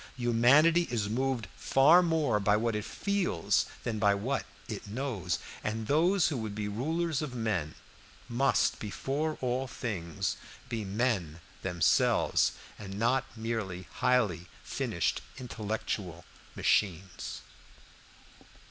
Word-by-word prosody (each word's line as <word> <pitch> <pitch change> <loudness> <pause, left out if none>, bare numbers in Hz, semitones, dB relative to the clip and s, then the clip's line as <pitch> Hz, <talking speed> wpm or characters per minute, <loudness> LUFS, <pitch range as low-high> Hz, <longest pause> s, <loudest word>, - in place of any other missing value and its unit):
Humanity 130 +8 +5
is 110 -4 -1
moved 130 0 0
far 150 +7 +5
more 160 -10 +2
by 105 +1 +3
what 115 0 0
it 105 - -2
feels 195 - 0 0.2
than 110 -3 -2
by 100 -1 +4
what 125 +7 -2 0.2
it - - -6
knows, 105 - -2 0.3
and 110 +1 -2
those 170 - +3
who 145 - -2
would 110 -3 -4
be 105 -1 -2
rulers 155 +8 -1
of 140 -5 -4
men 105 -10 -1 0.5
must 135 +4 +2
before 140 +9 -2
all 130 +1 0
things 90 - -3 0.3
be 115 -3 -2
men 100 -6 -1 0.2
themselves, 90 -3 +3 0.3
and 100 -2 -7
not 125 +4 +2
merely 110 -6 -3
highly 115 -9 +2 0.2
finished - - -1 0.2
intellectual 105 -7 -4 0.3
machines. 95 -2 0
115 Hz, 115 wpm, -30 LUFS, 100-135 Hz, 0.5 s, Humanity